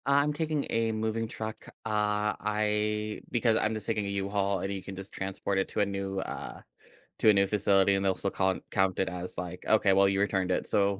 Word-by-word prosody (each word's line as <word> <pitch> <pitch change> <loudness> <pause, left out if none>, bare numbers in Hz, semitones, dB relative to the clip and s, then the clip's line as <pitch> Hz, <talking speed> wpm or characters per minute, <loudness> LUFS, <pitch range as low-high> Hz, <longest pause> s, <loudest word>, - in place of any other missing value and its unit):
I'm 140 +2 +3
taking 155 -1 -1
a 115 0 +1
moving 110 +1 -1
truck. 110 0 -6 0.2
Uh, 105 -1 +1
I 105 0 -1
because 115 -2 +2
I'm 110 0 +1
just 110 -2 -4
taking 110 -3 -1
a - - -3
U-Haul, 100 0 0
and 95 - -2
you 95 - -4
can 95 +1 -8
just 95 +1 -8
transport 95 0 -2
it 95 - 0
to - - -1
a - - +4
new, 100 -1 -3
uh - - -6 0.6
to - - +5
a - - +8
new 100 -1 +3
facility, 100 -1 +3
and 95 - 0
they'll 95 -1 +2
still 100 - -2
cont 95 -1 0
count 95 -2 +1
it 95 - +1
as, 90 0 -6
like, 90 0 -5
"Okay, 105 -3 +4
well, 100 +1 +5
you 95 0 +1
returned 95 -2 +1
it, - - 0
so 100 -1 +2
100 Hz, 225 wpm, -29 LUFS, 95-110 Hz, 0.6 s, a